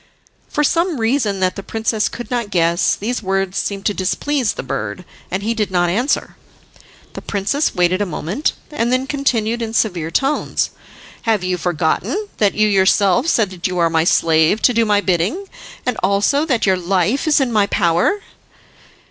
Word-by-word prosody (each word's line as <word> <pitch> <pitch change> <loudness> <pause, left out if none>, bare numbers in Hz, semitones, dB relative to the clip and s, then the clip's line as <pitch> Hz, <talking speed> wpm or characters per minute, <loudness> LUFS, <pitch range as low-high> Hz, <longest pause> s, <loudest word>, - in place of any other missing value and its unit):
For 295 - 0
some 335 0 +1
reason 225 -4 0
that 185 0 +1
the 195 - -5
princess 220 +1 -1
could 240 - -8
not 235 -4 -1
guess 170 -1 +2
these 235 +4 -3
words 195 -1 -1
seemed 200 -1 -4
to 205 - +2
displease 230 +6 -1
the - - -6
bird, 105 - -4 0.2
and 190 +2 -3
he 225 +2 0
did 215 -3 -1
not 175 -2 +1
answer. 245 +9 -1 0.8
The - - -7
princess 210 +9 -1
waited 180 +2 +2
a - - +1
moment, 180 - -2 0.2
and 240 -5 -1
then 255 +1 +1
continued 240 -5 -1
in 225 0 -4
severe 175 -8 0
tones, 275 - 0 0.6
"Have 215 -4 +2
you 185 0 0
forgotten 180 - -1
that 205 -2 +2
you 215 0 +3
yourself 200 - +3
said 220 - +2
that 180 -1 -3
you 180 -1 -4
are 170 -1 +2
my 160 -1 +2
slave 165 +3 +3
to 250 - +5
do 230 0 +2
my 205 -1 +2
bidding, 190 - 0 0.4
and 250 - 0
also 205 - +2
that 250 -7 +1
your 190 -2 +3
life 190 - 0
is 300 - +4
in 265 -3 0
my 205 -2 +3
power?" 180 - +1
205 Hz, 180 wpm, -18 LUFS, 180-245 Hz, 0.8 s, to